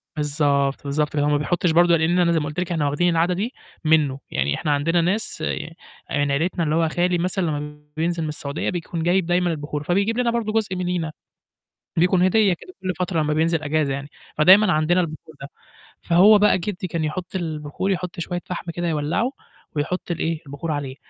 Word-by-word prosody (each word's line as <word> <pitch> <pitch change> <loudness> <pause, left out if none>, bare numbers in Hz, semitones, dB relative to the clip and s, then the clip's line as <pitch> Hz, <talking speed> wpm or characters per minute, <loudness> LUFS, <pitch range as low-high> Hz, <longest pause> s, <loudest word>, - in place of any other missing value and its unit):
بالضبط، 145 -2 0
بالضبط، 150 +1 0
فاللي 145 -1 +1
هو 150 - +2
ما 145 - +3
بيحطّش 175 +3 0
برضه 170 +1 +5
لإن 165 +3 +2
أنا 170 -1 +3
زي 165 - +2
ما 150 - -3
قُلت 150 +4 -4
لِك 180 0 -2
إحنا 160 -4 0
واخدين 175 +5 +1
العادة 170 +2 +2
دي 210 +8 -3 0.3
منّه، 150 -4 +3
يعني 70 +1 0
إحنا 150 - -1
عندنا 165 +4 +2
ناس 195 +6 -1
ي - - -1 0.6
آه، - - -6
يعني 145 -1 +1
عيلتنا 170 +4 0
اللي 155 -1 0
هو 165 -1 +2
خالي 175 +2 +1
مثلًا 185 +2 -1
لمّا 150 -1 -4 0.2
بينزل 165 +1 0
من 155 - -2
السعودية 145 -1 -3
بيكون 170 -2 -4
جايب 180 +1 +2
دايمًا 175 0 +1
البخور 150 -1 -4
فبيجيب 200 +8 +1
لنا 240 -1 +2
برضه 225 -2 -1
جزء 215 -4 0
مننا، 180 -3 -2 0.9
بيكون 180 +2 +3
هدية 195 +1 +4
كده 365 - -11
كل 185 -1 -2
فترة 180 -3 0
لمّا 150 0 0
بينزل 160 +1 +1
إجازة 150 -2 0
يعني، 140 +1 -5 0.3
فدايمًا 190 +5 +7
عندنا 165 +4 +2
البخور 155 -1 -7
ده. 140 - -6 0.5
فهو 190 +5 +6
بقى 205 -2 +4
جدّي 190 0 -4
كان 165 -1 -2
يحُط 175 +5 -4
البخور 160 +1 -3
يحُط 180 -1 -3
شوية 175 +1 -3
فحم 175 -1 -5
كده 175 +1 -3
يولّعه 160 - 0 0.4
ويحُط 170 +5 -2
ال 170 - -3
إيه، 165 -1 -1
البخور 145 +4 -5
عليه. 140 -3 -3
165 Hz, 205 wpm, -22 LUFS, 150-180 Hz, 0.9 s, فدايمًا